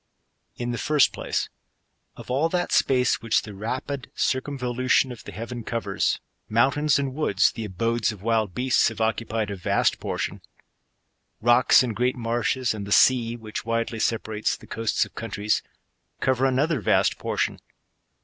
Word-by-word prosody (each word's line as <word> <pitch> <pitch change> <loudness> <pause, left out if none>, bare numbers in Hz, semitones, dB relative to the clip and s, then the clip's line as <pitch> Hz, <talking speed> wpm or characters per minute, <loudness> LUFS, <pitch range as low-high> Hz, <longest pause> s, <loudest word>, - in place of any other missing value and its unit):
In 120 0 -3
the 120 - -3
first 150 -3 +3
place, - - -2 0.7
of - - -9
all 145 +6 +2
that 175 0 -1
space 125 -2 +2
which 115 -1 +1
the 105 - -9
rapid 125 +6 -4
circum 140 +2 -1
volution 125 +1 +1
of 120 - -9
the - - -9
heaven 115 +2 -6
covers, 100 -4 -1 0.3
mountains 140 +6 +3
and 140 -2 -2
woods, 105 - +2
the. 115 - -6
abodes 115 +4 0
of 100 -3 -11
wild 110 -4 0
beasts, 125 0 +3
have 115 -1 -4
occupied 110 -1 -1
a - - -3
vast 90 - +1
portion; - - -3 1.0
^ - - -12
roo1$;8, 120 +2 +6
and 115 -4 -3
great 125 +1 +1
marshes, 120 +1 0
and 100 -2 -6
the - - -7
sea, 120 0 +4
which 110 -2 -6
widely 115 0 -2
separates 110 -1 -1
the - - -15
coasts 115 -1 0
of - - -16
countries, 105 +3 -1 0.6
cover 130 0 +2
another 140 +3 +1
vast - - +2
portion. - - -1
120 Hz, 160 wpm, -25 LUFS, 110-130 Hz, 1.0 s, roo1$;8